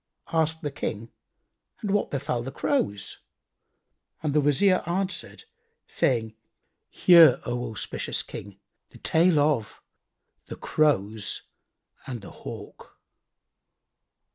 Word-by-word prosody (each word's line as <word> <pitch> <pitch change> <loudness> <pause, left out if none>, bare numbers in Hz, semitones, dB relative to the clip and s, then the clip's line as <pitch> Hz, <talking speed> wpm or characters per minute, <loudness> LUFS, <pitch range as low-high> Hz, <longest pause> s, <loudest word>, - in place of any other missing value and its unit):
Asked 160 0 +1
the 145 - -2
King, 115 -5 -5 0.7
"And 205 - -1
what 205 0 +1
befel 135 -3 -2
the 130 +3 -6
Crows?"; 105 - -1 1.0
and 150 -2 0
the 150 - +4
Wazir 165 +7 +4
answered 185 +1 -2 0.4
saying, 115 -4 0 0.6
"Hear, 170 -6 +7
O 120 0 -3
auspicious 110 - -2
King, 100 -1 -9 0.3
the - - -15
tale 165 0 +3
of 145 -7 +1 0.7
The - - -6
Crows 110 -9 0 0.6
and 125 -4 -5
the - - -10
Hawk. - - -10
145 Hz, 105 wpm, -26 LUFS, 115-165 Hz, 1.0 s, Hear